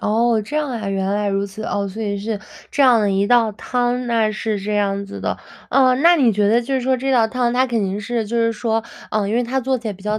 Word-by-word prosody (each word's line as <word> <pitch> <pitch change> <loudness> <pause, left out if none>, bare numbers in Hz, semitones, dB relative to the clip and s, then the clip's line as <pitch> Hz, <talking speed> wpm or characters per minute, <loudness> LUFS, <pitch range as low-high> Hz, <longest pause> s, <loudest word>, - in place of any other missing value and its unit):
哦， 225 +1 +2
这 295 +9 -5
样 300 -3 -1
啊， 220 -4 -4
原 195 -1 -1
来 205 0 0
如 195 0 0
此， 200 +2 -8
哦， 200 -3 -2
所 205 +3 -6
以 200 -1 -2
是 210 0 -4 0.3
这 285 - +1
样 250 -4 +6
的 205 -2 +1
一 195 +1 +1
道 235 -2 +3
汤， 245 +3 -1
那 225 -2 +1
是 215 0 -2
这 205 +2 -4
样 200 -1 0
子 200 - -9
的。 - - -2 0.3
啊， 260 -2 +4
那 340 +6 +5
你 255 -7 +3
觉 205 0 +2
得 230 +2 +4
就 270 +3 -3
是 260 - +1
说 260 +1 +1
这 265 +1 -1
道 230 -3 +4
汤 245 0 -1
它 255 +1 +2
肯 235 -3 -1
定 195 +2 -3
是， 225 0 -2
就 235 - -5
是 230 0 +2
说， 225 0 -1 0.3
呃， 210 -2 0
因 220 - -1
为 245 - +2
它 260 +3 -1
做 260 0 0
起 230 - -5
来 210 - -2
比 190 - -15
较 210 +1 -1
225 Hz, 300 characters per minute, -20 LUFS, 205-245 Hz, 0.3 s, 样